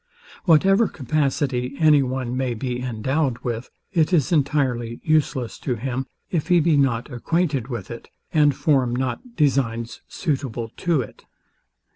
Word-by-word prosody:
Whatever 195 +6 +5
capacity 135 -2 -1
any 155 -3 +5
one 130 -1 -2
may 130 -2 -1
be 125 +2 -3
endowed 130 +3 -1
with, 120 0 -3 0.2
it 165 -2 +2
is 155 -6 +2
entirely 135 -6 0
useless 145 -6 0
to 125 - -2
him, 130 +3 -3 0.2
if 165 -5 -1
he 180 -2 +5
be 165 -1 +3
not 135 -2 +1
acquainted 145 -1 0
with 120 -7 -6
it, 115 - -9 0.2
and 150 -3 +4
form 130 -6 +2
not 130 - -3
designs 125 -6 0
suitable 130 -8 -3
to 170 -6 +1
it. 110 - -10
135 Hz, 140 wpm, -23 LUFS, 120-155 Hz, 0.2 s, Whatever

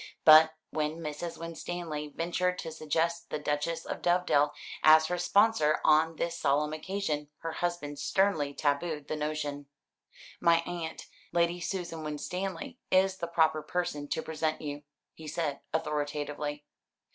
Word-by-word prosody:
But 160 0 +9 0.2
when 155 0 -1
Mrs. 165 +1 -5
Winstanley 165 -2 -5
ventured 180 +2 0
to 165 - -5
suggest 160 +2 -1
the - - -2
Duchess 150 +2 -2
of - - -5
Dovedale, 175 -5 +3 0.3
as 155 0 +7
her 180 +2 -2
sponsor 180 -4 +3
on 160 +1 +4
this 170 +1 -2
solemn 150 +1 +1
occasion, 155 -3 -2
her 165 - -3
husband 160 -5 -3
sternly 160 -4 +1
tabooed 150 0 -1
the - - -1
notion. 150 -2 -3 0.7
"My 170 0 +4
aunt, 170 -2 -5 0.3
Lady 170 +1 +2
Susan 170 -3 -4
Winstanley, 190 - -4
is 190 0 +3
the 170 - -3
proper 160 -2 +2
person 150 -4 -2
to 160 - -2
present 155 0 -2
you," 145 -1 -5 0.3
he 160 - -11
said 150 -2 -2
authoritatively. 150 -1 -2
160 Hz, 135 wpm, -30 LUFS, 150-175 Hz, 0.7 s, But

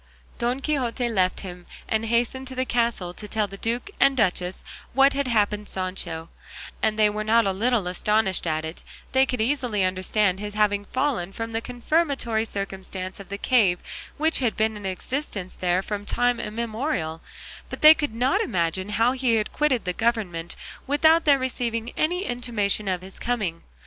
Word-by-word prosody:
Don 245 +3 0
Quixote 255 -4 0
left 185 -5 +1
him, 180 -2 -9 0.2
and 220 0 0
hastened 240 +3 0
to 260 - -6
the 255 0 0
castle 230 -8 0
to 210 - -6
tell 215 0 0
the 195 -1 -9
duke 235 - -3
and 275 -1 +4
duchess 185 -4 0 0.3
what 270 +2 +5
had 280 -1 -1
happened 210 -3 +1
Sancho, 185 -3 -4 0.5
and 215 -1 +1
they 215 -1 +5
were 210 +1 -2
not 225 +1 +4
a 195 - +2
little 225 +1 +1
astonished 190 0 +1
at 155 0 -1
it; 160 +2 -7 0.3
they 265 0 +4
could 250 - -2
easily 235 -4 +1
understand 185 +1 +1
his 205 0 -5
having 205 -1 +2
fallen, 255 -8 -1
from 225 +3 -5
the 225 0 -2
confirmatory 250 -3 0
circumstance 190 -2 -5
of 200 - -10
the 200 - -4
cave 205 -6 +3 0.4
which 315 +2 +3
had 245 -4 0
been 220 0 +1
in 205 -2 -5
existence 195 0 -4
there 180 +1 0
from 205 0 -4
time 245 +3 +1
immemorial; 220 - -3 0.5
but - - -7
they 310 +1 +11
could 295 -7 -3
not 250 +3 +2
imagine 185 0 -1
how 225 +4 +3
he 255 -3 +1
had 215 -1 -1
quitted 275 -7 +1
the 180 - -1
government 195 -7 -1 0.3
without 315 +4 +4
their 285 -2 +6
receiving 240 -3 -2
any 355 +4 0
intimation 225 -4 -1
of 185 -1 -1
his 190 +1 -10
coming. 210 -9 -2
220 Hz, 175 wpm, -25 LUFS, 190-250 Hz, 0.5 s, they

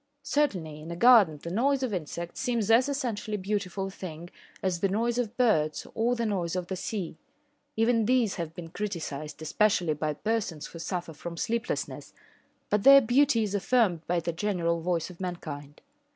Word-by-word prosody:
Certainly 185 - -1
in 160 - -9
a 170 - -4
garden 200 -7 +6
the 170 - -5
noise 265 +7 +1
of 245 -5 -1
insects 170 0 -5
seems 235 -4 0
as 250 +5 +5
essentially 230 -6 -2
beautiful 195 -1 -2
a 195 - -5
thing 175 -2 -8 0.3
as 185 -2 0
the 195 - +1
noise 235 +4 0
of 235 -1 -3
birds 160 -12 +2
or 235 +2 +1
the 235 -1 -1
noise 185 -5 -1
of 180 -1 -2
the 190 - -2
sea. 185 -3 -4 0.6
Even 225 0 +3
these 245 -5 +3
have 165 -3 -5
been 165 -2 -8
criticised, 160 -8 -5
especially 180 -2 +2
by 150 0 -2
persons 195 -4 -2
who 165 - -9
suffer 170 -1 -4
from 170 +3 -7
sleeplessness, 230 +6 -3 0.6
but 210 - +3
their 275 +4 +9
beauty 250 -1 +3
is 205 -2 -3
affirmed 205 -4 +2
by 175 0 +1
the 170 0 -3
general 170 -2 0
voice 175 0 -1
of 180 - -13
mankind. 150 -5 -6
195 Hz, 180 wpm, -28 LUFS, 170-230 Hz, 0.6 s, their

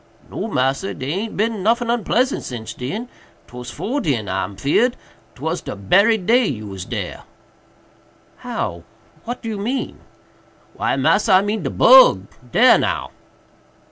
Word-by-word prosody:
"No, - - -4
massa, 135 - -1
dey 130 +2 -4
aint 210 +6 -4
bin 220 0 -1
noffin 230 +3 +1
onpleasant 240 +3 0
since 115 -3 -7
den—'twas 125 - -9
'fore 270 - -3
den 120 - -1
I'm 95 +1 -3
feared—'twas 160 - -2
de - - -6
berry 200 - +3
day 230 +6 +3
you 110 -5 -4
was 95 -3 -7
dare." - - -5 1.2
"How? 85 0 -4 0.4
what 240 +2 -6
do 225 - -4
you 210 -2 -4
mean?" 245 +7 -3 0.7
"Why, - - -1
massa, 210 - +2
I 185 +1 +6
mean 210 +1 -2
de - - -3
bug—dare 185 - +5
now." - - -2
195 Hz, 135 wpm, -20 LUFS, -, 1.2 s, I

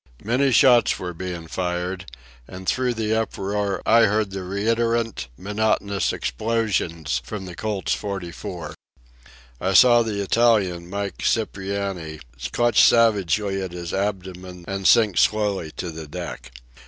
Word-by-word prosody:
Many 130 +6 +2
shots 120 -1 +5
were 90 -1 -5
being 85 -1 -6
fired, 90 0 -3 0.4
and 95 0 -10
through 125 -2 +1
the 110 -1 -1
uproar 100 -3 -2
I 115 0 +6
heard 105 0 0
the 95 0 -5
reiterant, 115 - -1
monotonous 100 0 0
explosions 85 - -1
from 105 +2 -6
the 90 - -8
Colt's 105 +1 -2
.44 90 -4 -6 0.9
I 95 - 0
saw 120 +3 +7
the 110 -3 -2
Italian, 100 -5 +2
Mike 100 -1 -4
Cipriani, 95 -7 -2 0.3
clutch 120 -1 +3
savagely 100 -3 +3
at 95 -2 -5
his 85 -1 -6
abdomen 95 -2 -4
and 95 -1 -1
sink 105 -6 +5
slowly 100 -6 +1
to 85 - -5
the 80 -1 -8
deck. 70 - -7
100 Hz, 130 wpm, -23 LUFS, 90-110 Hz, 0.9 s, saw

